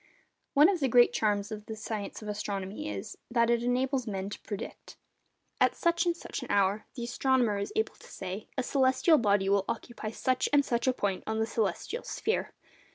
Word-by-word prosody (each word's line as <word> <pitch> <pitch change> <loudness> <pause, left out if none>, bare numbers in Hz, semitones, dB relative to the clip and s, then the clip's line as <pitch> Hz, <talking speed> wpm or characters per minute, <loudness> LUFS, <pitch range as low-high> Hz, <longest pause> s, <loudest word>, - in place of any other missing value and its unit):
One 295 +3 +8
of 380 -2 +1
the 270 - +2
great 245 0 +6
charms 205 -1 0
of 215 0 -7
the 220 - -5
science 215 -1 -5
of - - -7
astronomy 200 - -4
is, 100 -2 -6
that 235 -1 +3
it 235 -1 +2
enables 250 +1 0
men 195 -1 -3
to - - -6
predict. 205 -2 -7 0.6
At - - +4
such 340 0 +1
and 340 0 +1
such - - -6
an - - -8
hour, 200 +1 +2
the 240 - -4
astronomer 240 -3 +1
is 200 - -3
able 440 0 0
to - - -17
say, 190 +2 -6
a 260 - +1
celestial 265 +4 +4
body 200 -3 +2
will 200 0 +3
occupy 235 -3 -4
such 255 +3 0
and 285 -1 +4
such 235 +1 0
a 260 - +4
point 200 -6 -1
on 220 0 -1
the 220 - +2
celestial 225 - -2
sphere. 440 - -2
225 Hz, 200 wpm, -30 LUFS, 205-260 Hz, 0.6 s, One